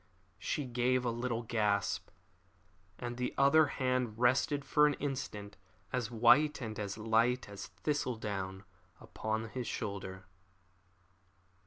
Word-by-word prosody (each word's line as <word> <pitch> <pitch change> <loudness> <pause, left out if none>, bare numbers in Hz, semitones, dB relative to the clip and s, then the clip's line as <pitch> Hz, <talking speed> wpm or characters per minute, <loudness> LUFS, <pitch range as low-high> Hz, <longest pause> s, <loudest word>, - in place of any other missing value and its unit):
She 140 +9 -2
gave 125 +1 +1
a 120 - +1
little 120 0 -2
gasp, 105 -3 0 0.9
and 120 0 -5
her 125 - +1
other 140 +3 +6
hand 125 -5 -1
rested 130 +4 +2
for 150 0 +5
an 145 - +1
instant, 105 -8 -4 0.4
as 125 -4 -1
white 125 +6 +5
and 110 -4 -5
as 100 -1 -3
light 115 +3 +2
as 100 -1 -7
thistle 145 -5 -2
down, 95 -3 -4 0.4
upon 110 +1 -3
his 125 +1 -4
shoulder. 95 -2 -4
120 Hz, 125 wpm, -33 LUFS, 105-130 Hz, 0.9 s, other